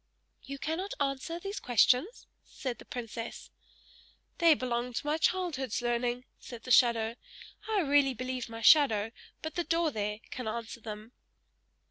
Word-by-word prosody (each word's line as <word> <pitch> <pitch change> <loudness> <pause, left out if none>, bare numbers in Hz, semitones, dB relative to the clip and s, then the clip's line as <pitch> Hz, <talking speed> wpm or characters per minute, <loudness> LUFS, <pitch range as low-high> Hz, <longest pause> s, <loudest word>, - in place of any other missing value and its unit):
"You 275 +1 -7
cannot 325 +7 -3
answer 275 +4 -1
these 395 +3 -5
questions?" 250 - +2 0.2
said 250 -5 -5
the - - -12
princess. 230 -1 -6 0.9
"They 335 -2 +6
belong 245 -1 -2
to 235 - -3
my 300 +2 0
childhood's 325 - 0
learning," 240 +1 -1
said 235 -2 -10
the 255 - -5
shadow. 235 -2 +4 0.5
"I 430 -3 +2
really 280 -3 +3
believe 255 0 -4
my 225 0 -7
shadow, 225 -6 +6 0.3
by 315 - -2
the 345 +2 -2
door 330 -1 +1
there, 210 -3 -2
can 250 -3 -5
answer 230 +1 -5
them!" 215 +1 -8
255 Hz, 145 wpm, -31 LUFS, 235-310 Hz, 0.9 s, They